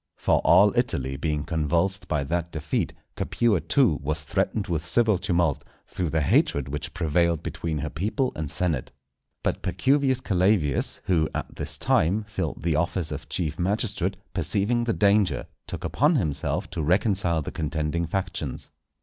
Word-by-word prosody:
For - - +2
all - - +5
Italy 65 +1 0
being 75 +1 -1
convulsed 85 +4 0
by 75 -4 0
that 85 +4 -2
defeat, 75 -2 -2 0.2
Capua 110 -8 +1
too 85 - +2
was 75 +1 -1
threatened 100 +7 -1
with 80 -4 -2
civil 110 0 +2
tumult, 85 -6 +1 0.2
through 90 -3 -3
the 80 +1 +1
hatred 70 0 +2
which 75 +1 -5
prevailed 85 -1 +1
between 80 -2 -3
her 75 +1 -3
people 110 - -1
and 75 -2 -4
senate. 80 -7 -1 0.5
But - - -1
Pacuvius 130 +6 +2
Calavius, 90 - +1
who 80 -4 +2
at - - -4
this - - -4
time 95 +8 +2
filled 105 -8 -4
the 80 -2 +1
office 85 +1 -1
of - - -6
chief 85 -3 -2
magistrate, 100 0 -1 0.2
perceiving 100 +7 0
the 115 - +1
danger, 100 -1 +2 0.2
took - - -6
upon 150 +5 +2
himself 80 - -1
to 85 - -3
reconcile 90 -1 +1
the - - -5
contending 80 +2 -2
factions. 90 -7 -4
85 Hz, 155 wpm, -25 LUFS, 75-100 Hz, 0.5 s, all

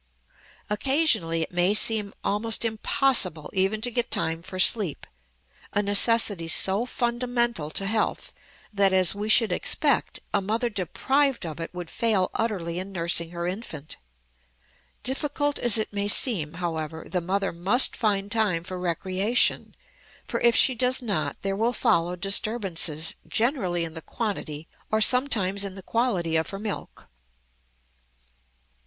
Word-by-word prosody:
Occasionally 215 - +1
it - - -7
may 180 +3 +2
seem 215 -2 +4
almost 225 +3 +1
impossible 220 - +1
even 195 +3 0
to 245 +1 0
get 240 0 -1
time 165 0 -1
for 185 +2 -9
sleep, 190 -4 +2 0.7
a 205 - +1
necessity 205 -3 +3
so 195 +7 +2
fundamental 240 -8 -2
to 195 +5 0
health 215 +2 -2 0.4
that, 200 -2 +3
as 185 -2 +3
we 205 +2 -5
should 225 +1 +4
expect, - - +1
a - - +1
mother 225 +5 -2
deprived 265 - -1
of 155 -2 -7
it 165 - -6
would 175 -2 -8
fail 220 -6 +1
utterly 180 -7 -2
in 190 +2 -7
nursing 170 -2 0
her 170 0 -5
infant. 175 -6 -6 1.1
Difficult 290 +2 -2
as 240 -2 +4
it 215 -1 -3
may 200 0 -1
seem, 195 - +4
however, 160 -2 -5
the 180 - -2
mother 195 +2 -2
must 195 +10 +2
find 205 -3 -1
time 205 -7 0
for 185 0 -7
recreation, 185 +6 +1 0.5
for - - -3
if 235 -1 +4
she 260 - +6
does 255 +2 0
not 210 -4 -2
there 195 0 -1
will 230 +4 0
follow 175 -5 +1
disturbances, 185 -5 0
generally 220 - -1
in 160 - -9
the 160 - -8
quantity, 165 -8 -5 0.2
or 215 - +2
sometimes 215 -5 +2
in 195 -1 -5
the 195 - -11
quality, 185 -10 -1
of 160 0 -2
her 195 - -6
milk. 205 0 -6
200 Hz, 145 wpm, -25 LUFS, 175-230 Hz, 1.1 s, she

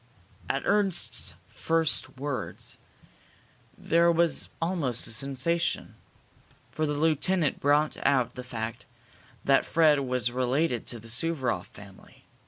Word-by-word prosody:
At - - -1
Ernst's 200 -4 +1
first 160 -4 0
words 140 0 -4 1.0
there 170 +1 +3
was 170 0 +2
almost 165 -9 -1
a - - -2
sensation, 140 +7 0 0.8
for 155 0 -1
the 145 - -1
lieutenant 160 +1 +1
brought 145 +2 +2
out 130 -4 +2
the 125 - -7
fact 115 -2 -5 0.6
that 135 0 +4
Fred 155 -3 +4
was 125 -3 -1
related 130 +1 0
to 120 - -4
the 115 - -13
Suvaroff 125 - -1
family. 100 -2 -16
145 Hz, 115 wpm, -28 LUFS, 125-165 Hz, 1.0 s, that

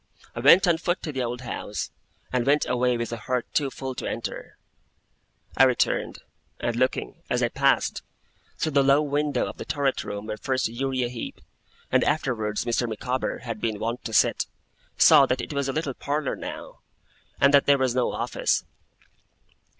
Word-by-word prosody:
I - - -4
went 160 +9 +7
on 165 -2 +3
foot 175 +2 -1
to 155 - -3
the 135 -2 -3
old 120 0 -3
house, 125 - -5 0.4
and 125 -1 +2
went 145 +3 +3
away 125 0 +1
with 120 0 -3
a - - -3
heart 125 +2 -2
too 140 -2 +1
full 130 0 -5
to - - -4
enter. - - -6 1.0
I 135 - +6
returned; 130 -2 0 0.4
and 120 - -1
looking, 130 +2 -1
as - - +1
I - - +2
passed, - - +1 0.6
through 155 - -1
the 140 -1 +4
low 140 +2 +4
window 145 0 0
of - - -7
the - - -5
turret 140 -2 0
room 100 0 -6
where 110 0 -4
first 130 +3 0
Uriah 130 +1 -2
Heep, 120 -1 -7 0.5
and - - +4
afterwards 120 -9 -1
Mr. 120 0 0
Micawber, 125 +5 -3
had 115 -3 -5
been 110 -2 -1
wont 115 +3 -3
to 115 - -4
sit, 105 - +3 0.5
saw 135 - +7
that 125 +1 0
it 150 - -5
was 140 -1 -1
a - - 0
little 145 -1 -2
parlour 145 +2 -2
now, - - -8 0.6
and 140 - +5
that 140 - +5
there 140 0 +6
was 130 -2 +1
no 125 -1 +1
office. - - 0
130 Hz, 180 wpm, -25 LUFS, 120-140 Hz, 1.0 s, went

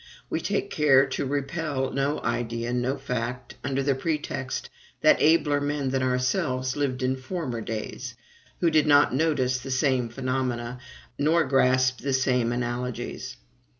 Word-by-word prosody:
We - - -1
take - - -1
care 135 -3 +5
to 135 - -2
repel 140 -1 -2
no 140 +2 -1
idea, 120 0 -2
no 125 +3 0
fact, 125 -2 -4
under 135 0 -1
the 140 0 +2
pretext 135 -2 -3 0.3
that - - +5
abler 150 -2 +4
men 145 -2 -1
than 135 0 0
ourselves 130 0 0
lived 135 -3 -1
in 130 +1 +1
former 130 -3 -4
days, 115 +2 -5 0.5
who 170 -2 +3
did 155 -1 +3
not 145 -3 +5
notice 130 -4 +1
the 130 +2 -8
same 130 -2 +1
phenomena, 125 -1 -2 0.4
nor 160 +3 +3
grasp 130 -2 +3
the 140 -1 -2
same 125 -3 +2
analogies. 125 +1 -4
130 Hz, 145 wpm, -26 LUFS, 125-145 Hz, 0.5 s, care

